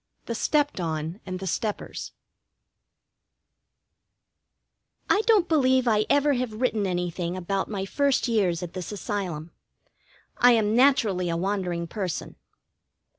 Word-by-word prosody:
IV - - -43
THE 235 - -3
STEPPED 290 +2 +1
ON 160 +2 -3
AND 185 0 -3
THE 190 - -6
STEPPERS 210 +4 -3 3.0
I 415 - +4
don't 420 -6 +5
believe 260 -5 +3
I 215 -2 +2
ever 285 0 +3
have 250 -3 -2
written 225 -5 +1
anything 175 0 -2
about 195 +2 -2
my 195 -3 -3
first 280 +5 +1
years 190 -7 +1
at 175 - -7
this 185 +1 -5
Asylum. 185 -6 -4 0.9
I 245 0 +7
am 220 -1 +2
naturally 220 -9 +3
a 165 - -1
wandering 180 -2 -1
person. 185 0 -4
205 Hz, 125 wpm, -26 LUFS, 180-250 Hz, 3.0 s, I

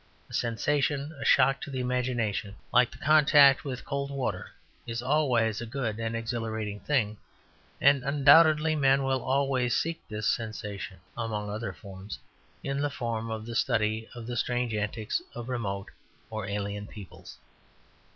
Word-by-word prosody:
A - - -11
sensation, 140 +5 0
a - - -2
shock 135 +1 +4
to - - -6
the 130 -2 -4
imagination, 120 -5 -1 0.2
like 125 0 +5
the - - -13
contact 145 -2 +6
with 130 -3 -5
cold 140 -1 -2
water, 135 -3 -3 0.4
is 115 0 -3
always 125 -6 +2
a - - -4
good 115 -3 -3
and 115 0 -2
exhilarating 110 -3 -3
thing; 110 -7 0 0.6
and, 140 -1 +5
undoubtedly, 150 +3 +5
men 135 -2 +3
will 135 -1 0
always 130 -2 +1
seek 165 0 -2
this 105 0 -4
sensation 105 -4 -3 0.2
(among 105 -3 -3
other 110 +3 -3
forms) 100 0 -9 0.5
in 140 +1 -2
the 145 - +1
form 115 -4 -3
of 110 -1 -4
the 120 - -6
study 110 0 0
of 120 -1 -7
the 120 +1 -4
strange 120 0 -1
antics 105 +1 -2
of 120 +1 -6
remote 100 -6 -3 0.4
or 110 -3 -4
alien 100 0 -3
peoples. 100 -4 -11
120 Hz, 150 wpm, -28 LUFS, 110-135 Hz, 0.6 s, contact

